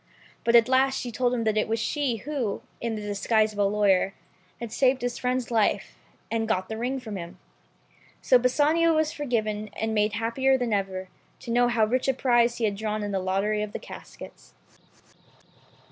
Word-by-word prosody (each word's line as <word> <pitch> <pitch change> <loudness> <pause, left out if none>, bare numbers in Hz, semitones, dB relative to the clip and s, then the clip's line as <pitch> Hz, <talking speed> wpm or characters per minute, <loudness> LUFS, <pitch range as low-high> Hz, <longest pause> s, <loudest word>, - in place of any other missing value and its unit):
But 235 - +3
at 230 0 +7
last 265 +1 +2
she 245 - -5
told 245 +2 0
him 240 -2 -1
that 215 -1 +1
it - - 0
was 225 +1 -1
she 265 +2 -1
who, 270 -9 -3 0.2
in 235 -1 -2
the 210 - -6
disguise 215 +2 +1
of - - -12
the 200 -1 +2
lawyer, 200 -2 +2 0.4
had 235 -2 -6
saved 260 +1 +2
his 245 -1 -2
friend's 250 -1 -1
life, 220 -3 +1 0.4
and 225 -1 0
got 185 -4 -1
the 220 - -4
ring 255 +3 -2
from 220 -5 -6
him. 170 -1 -8 0.8
So 255 - +4
Bassanio 305 +6 +3
was 310 0 +1
forgiven, 215 -7 -2
and 220 0 -2
made 210 0 +1
happier 235 +5 +1
than 245 -3 -1
ever, 190 -2 -2 0.3
to 235 - -6
know 245 +1 +4
how 235 -2 +2
rich 250 +5 0
a 265 - +2
prize 240 -2 +2
he 230 - 0
had 205 -2 -1
drawn 215 0 -2
at 205 - -3
the 195 - 0
lottery 195 +3 0
of 210 -1 -4
the - - -2
caskets. - - -12
230 Hz, 195 wpm, -26 LUFS, 210-250 Hz, 0.8 s, at